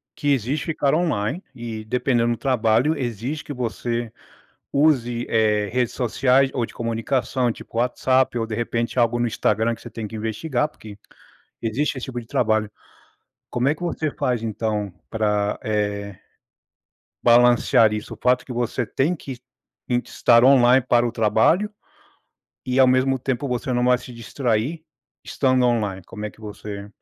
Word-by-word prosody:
que 145 - -2
exige 135 +4 -1
ficar 150 -4 0
online 155 - -1
e 115 -3 -6
dependendo 120 0 +1
do - - -6
trabalho, 125 +4 +2
exige 125 +4 -4
que 150 - -6
você 120 -1 -3 0.6
use, 125 -5 +2
eh, 105 -2 +2
redes 125 -1 0
sociais 130 +2 +2
ou 125 - 0
de - - -8
comunicação, 120 +2 -1
tipo 115 - -8
WhatsApp, 125 +1 +1
ou 115 - -1
de 110 - -5
repente 115 +2 -2
algo 120 0 +2
no 120 - +1
Instagram 110 0 0
que - - -15
você - - -9
tem 110 -2 -6
que 110 - -11
investigar, 120 +7 -1
porque 110 -8 -12 0.7
existe 125 +6 -1
esse 125 - -5
tipo 125 -2 -5
de 115 - -13
trabalho. 110 -2 +1 0.8
Como 120 +1 0
é 145 - +2
que 160 - -13
você 160 -3 -2
faz 125 -4 -1
então 105 -2 -2 0.2
pra, 105 -2 0
eh, 105 -2 -2 1.1
balancear 120 -2 +5
isso? 105 0 -5
O - - -21
fato 125 0 +2
que 125 - -5
você 120 +1 -1
tem 155 +7 0
que 135 -5 -8 0.5
e 125 - +2
estar 120 -1 +4
online 130 -1 +6
para 120 -1 +4
o 120 - -1
trabalho 115 - +2 1.0
e, 130 0 -1
ao 130 - +7
mesmo 130 +1 +2
tempo, 130 +2 -2
você 125 +1 -2
não 125 0 +1
vai 125 0 +4
se 125 0 -11
distrair 120 +5 -2 0.4
estando 130 -2 +1
online? 105 -6 0
Como 105 -1 -8
é 105 - -3
que - - -22
você 105 -1 -8
120 Hz, 165 wpm, -22 LUFS, 110-130 Hz, 1.1 s, ao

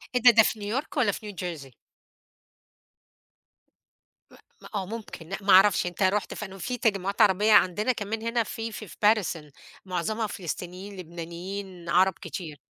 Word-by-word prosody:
إيه 250 - +2
ده، 245 - +9
ده 225 -1 +6
في 215 - -1
New 210 +6 -1
York 310 - -12
والّا 225 -5 +3
في 210 +1 -7
New - - -16
jersey؟ 160 -8 -6 2.6
م - - -16 0.3
م - - -14
آه 195 -2 -1
ممكن، 205 -6 -8
لأ، 195 - -3
ما 195 0 +4
أعرفش 190 0 +6
أنت 180 +2 -2
رُحت 195 +2 +1
في 210 - -5
أنهو؟ 195 0 -10
فيه 245 +8 -3
تجمعات 200 -2 0
عربية، 210 +1 +4
عندنا 210 +6 +4
كمان 220 -1 -4
هنا 230 +1 0
في 225 +1 -5
في 215 0 -8
Paterson 180 -7 +1 0.3
معظمها 210 +5 -2
فلسطينيين، 185 +2 -6
لبنانيين، 175 +1 -7
عرب 185 +2 +4
كتير. 160 -3 -7
195 Hz, 165 wpm, -27 LUFS, 180-215 Hz, 2.6 s, ده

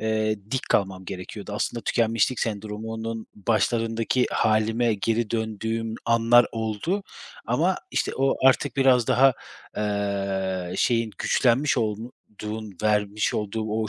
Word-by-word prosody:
eee, 110 0 0
dik 130 0 -2
kalmam 95 -2 +1
gerekiyordu. 95 +3 -7
Aslında 115 +3 -2
tükenmişlik 115 +1 +1
sendromunun 110 +1 -4
başlarındaki 115 +3 +1
hâlime 110 +2 +2
geri 115 +2 -1
döndüğüm 110 0 -2
anlar 115 +1 +5
oldu 110 - -2 0.4
ama - - +2
işte - - -1
o 135 +1 +2
artık 135 - +1
biraz 130 -3 +4
daha, 135 +1 +5 0.4
eee, 100 -3 -2
şeyin, 115 0 +1
güçlenmiş 130 +3 +2
olduğun 110 -1 -5
vermiş 105 -1 +1
olduğu 105 +1 -2
o 110 0 -2
110 Hz, 110 wpm, -25 LUFS, 105-115 Hz, 0.4 s, anlar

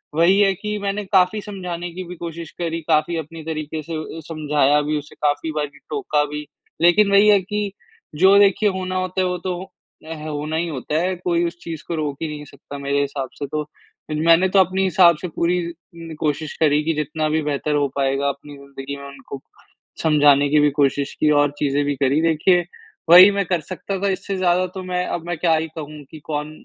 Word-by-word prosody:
वही 175 +5 +4
है 195 -1 +4
कि 210 +3 -4
मैंने 200 +1 -2
काफ़ी 190 +2 +2
समझाने 180 -4 -6
की 185 - -6
भी 180 - -8
कोशिश 170 -1 -7
करी 165 -1 -2
काफ़ी 160 +1 +2
अपनी 160 +1 -7
तरीक़े 155 -1 -4
से 165 +2 -8 0.2
अ, - - -5
समझाया 150 -2 +2
भी 150 +1 -1
उसे 145 - -13
काफ़ी 145 +2 -1
बारी 145 -2 -4
टोका 375 - 0
भी, 150 +1 -6 0.4
लेक़िन 200 +4 +5
वही 200 +1 +6
है 205 -1 +6
कि 205 +1 -3 0.4
जो 190 +5 +6
देखिए 205 +1 +4
होना 185 -1 -4
होता 185 +1 -2
है - - +1
वो 180 0 -2
तो 185 +1 -5 0.4
एह 155 -1 -7
होना 150 +1 -3
ही 170 +1 -1
होता 150 +1 -2
है 185 +1 -1
कोई 175 -1 0
उस 170 0 -7
चीज़ 160 -2 -7
को 170 - -2
रोक 145 -3 -3
ही 160 - -1
नहीं 150 -1 -7
सकता 145 0 -11
मेरे 140 0 0
हिसाब 140 -2 -3
से 145 - -2
तो। 150 +1 -3 0.5
मैंने 165 +4 +4
तो 195 - +4
अपने 190 +1 +2
हिसाब 175 -3 +5
से 180 - -3
पूरी 175 +2 0
उम, 165 -1 -12
कोशिश 150 0 -2
करी 150 -1 +3
कि 165 +1 0
जितना 150 +1 -2
भी 155 +1 +1
बेहतर 150 +1 -1
हो 145 -1 +2
पाएगा 140 0 0
अपनी 140 +1 -8
ज़िंदगी 140 0 -8
में 140 - -11
उनको 140 0 -10 0.6
समझाने 145 -2 +5
की 150 0 +4
भी 145 0 +4
कोशिश 140 0 +1
की 155 - +3
और 145 -1 +1
चीज़ें 145 0 +1
भी 145 -1 -1
करी 140 +3 +1
देखिए 165 +2 +3 0.4
वही 180 +3 +10
मैं 200 -1 -1
कर 175 -2 -1
सकता 190 +1 -4
था। 200 0 0
इससे 195 +1 -3
ज़्यादा 180 0 +2
तो 190 - -5
मैं 180 0 -2
अब 170 - -4
मैं 175 -2 -2
क्या 165 0 +2
ही 160 +1 -1
कहूँ 150 -1 -8
कि 155 - -10
कौन 150 -1 -3
160 Hz, 215 wpm, -21 LUFS, 150-180 Hz, 0.6 s, वही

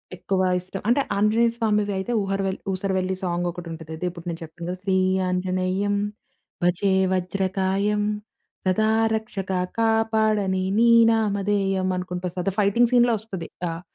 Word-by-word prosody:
ఎక్కువ 190 +1 -1 0.2
ఇష్టం. 185 +2 -7
అంటే 245 +4 +4 0.2
ఆంజనేయ 220 +3 +3
స్వామివివైతే 210 -2 0
ఊహరవెల్ 195 -1 -2
'ఊసరవెల్లి' 190 0 -1
సాంగొకటుంటది. 175 -2 -4
అదే 180 - -4
ఇప్పుడు 170 0 -11
నేను 165 -1 -5
చెప్పాను 170 +1 -8
కదా! 180 - -3
శ్రీ 190 -1 +1 0.3
ఆంజనేయం 185 +2 0 0.7
భజే 180 +3 +2 0.2
వజ్రకాయం 190 +2 0 0.6
సదా 215 +4 +2 0.3
రక్షక 195 -3 -4 0.3
కాపాడని 220 -4 +2
నీ 235 +1 +5 0.2
నామధేయం. 200 -3 +1
అనుకుంటూ 180 0 -4
వస్తది. 180 +2 -2
ఫైటింగ్ 230 +4 +3
సీన్‌లో 240 -1 +5
ఒస్తది 190 -7 -6 0.2
ఆహ్, 165 +1 -6
195 Hz, 120 wpm, -24 LUFS, 180-210 Hz, 0.7 s, నీ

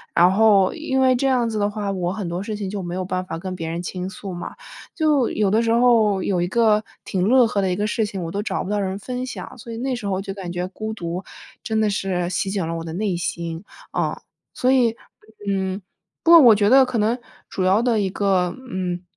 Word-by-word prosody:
然 175 +2 +6
后， 200 -2 +4
因 270 -5 -1
为 260 -1 +5
这 270 +2 +1
样 245 -3 +2
子 215 -1 -2
的 205 0 +1
话 205 -1 -3
我 180 -1 -2
很 195 -5 -4
多 175 +2 -3
事 210 +1 -4
情 200 -2 -4
就 200 -1 -4
没 175 0 -5
有 185 - -2
办 185 0 -3
法 165 - -5
跟 185 +2 -5
别 165 -2 -5
人 170 +1 -3
倾 180 +1 -4
诉 195 -1 -7
嘛。 175 - -6 0.4
就 300 -7 +2
有 205 -2 +1
的 220 +2 +3
时 230 -1 +1
候 225 -5 +4
有 180 -3 0
一 175 - 0
个 215 0 +3 0.2
挺 185 - -2
乐 250 0 +6
呵 200 -2 0
的 190 - 0
一 - - 0
个 205 +2 -1
事 220 0 0
情， 195 -3 -5
我 165 - -5
都 200 +2 -2
找 195 -2 -2
不 190 - -6
到 210 0 0
人 190 0 -2
分 250 +4 -4
享， 260 - -8
所 230 0 -9
以 - - -6
那 265 +3 -3
个 255 - 0
时 215 - -7
候 195 - -1
我 190 - -1
就 195 0 -5
感 185 -3 -6
觉 180 +1 -2
孤 220 +2 -5
独， 175 -2 -4 0.4
真 220 -1 0
的 215 - +2
是 185 -3 -1
席 190 +1 -1
卷 195 -5 -1
了 165 - -3
我 165 - -5
的 160 - -6
内 190 -2 -1
心。 170 0 -4 0.3
嗯。 - - 0 0.4
所 255 +1 +3
以， 240 -4 +3 0.5
嗯， 190 0 -1 0.4
不 335 - +4
过 335 - +11
我 235 -6 +8
觉 205 0 +2
得 265 0 +7
可 250 -2 -3
能， 225 +4 +1 0.3
主 185 - -2
要 195 +5 +4
的 235 -3 +2
一 195 -2 0
个 190 -2 +1 0.2
嗯， 180 -1 -3
200 Hz, 275 characters per minute, -22 LUFS, 185-225 Hz, 0.5 s, 过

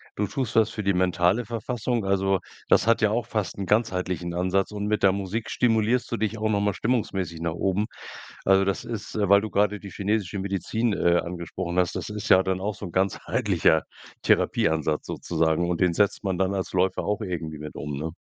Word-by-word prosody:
du 105 -1 -1
tust 125 -2 -3
das 110 -1 +4
für 105 - -5
die 100 0 +2
mentale 90 +5 +2
Verfassung. 120 -1 -2
Also, 95 -1 +2 0.3
das - - +4
hat 115 -1 +3
ja 105 - +4
auch 115 +1 0
fast 105 -6 -3
'n 100 - -3
ganzheitlichen 90 -5 0
Ansatz, 95 +3 0
und 105 0 -4
mit 105 0 0
der 95 -1 +5
Musik 100 +3 -3
stimulierst 115 +1 +1
du 115 - 0
dich 110 +1 -1
auch 110 0 0
noch 100 -1 +1
mal 100 -1 +1
stimmungsmäßig 95 -9 -1
nach 85 -1 -1
oben. 95 +4 0 0.6
Also, 95 0 +4
das 100 - -1
ist, 110 -3 -6
äh 100 -3 0
weil 100 0 +7
du 110 - -4
gerade 105 0 +1
die 100 - -10
chinesische 100 -1 -1
Medizin, 100 +4 -1
äh, 85 -2 +3
angesprochen 85 0 -5
hast, 90 -2 +2
das - - -4
ist 105 -1 -5
ja 95 - +7
dann 95 0 -2
auch 105 +2 -1
so 100 - -8
'n - - -10
ganzheitlicher 95 -4 +1 0.4
Therapieansatz 80 -1 +1
sozusagen. 80 +2 0
Und 90 +1 -1
den 90 -2 +3
setzt 100 +3 +1
man 95 -2 -1
dann 95 0 +1
als 95 -1 -3
Läufer 95 +1 +1
auch 105 +2 -1
irgendwie 80 -6 -4
mit 75 0 -8
um, 70 0 -5
ne? 80 +2 -3
95 Hz, 210 wpm, -25 LUFS, 90-105 Hz, 0.6 s, weil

